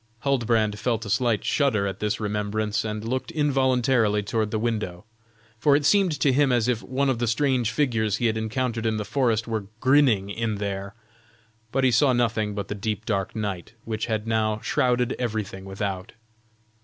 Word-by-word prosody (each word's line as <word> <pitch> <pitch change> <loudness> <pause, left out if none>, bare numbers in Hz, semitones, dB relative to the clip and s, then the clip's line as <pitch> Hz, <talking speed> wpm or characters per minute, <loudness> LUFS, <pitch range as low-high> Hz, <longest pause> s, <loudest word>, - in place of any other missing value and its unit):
Huldbrand 115 -6 +1
felt 115 -2 -1
a 100 - -4
slight 120 -3 +1
shudder 120 -9 +2
at 95 -2 -4
this 105 +1 -1
remembrance, 105 0 -1
and 110 0 -4
looked 130 +2 -2
involuntarily 130 -7 +2
toward 110 +1 -1
the 110 - -1
window, 105 -5 -3 0.5
for 140 +4 +4
it 145 0 +1
seemed 185 -4 +3
to 140 - +4
him 140 0 +3
as 120 -2 +2
if 120 -3 0
one 135 +2 -1
of 130 -3 0
the 120 - 0
strange 125 0 +1
figures 115 -5 +1
he 120 - -1
had 110 -1 +2
encountered 115 +1 -2
in 110 -1 0
the 105 - -3
forest 115 -2 0
were 110 -3 -3
grinning 130 -8 +3
in 110 0 -2
there; 100 0 -4 0.8
but 135 - 0
he 130 - +4
saw 130 +3 +4
nothing 110 -4 0
but 100 -2 -4
the - - -3
deep 105 +1 -3
dark 100 -4 -2
night, 100 -3 -4
which 110 0 -3
had 110 -2 -2
now 110 -1 0
shrouded 125 -1 +1
everything 105 -5 -3
without. 95 0 -4
110 Hz, 180 wpm, -25 LUFS, 105-125 Hz, 0.8 s, for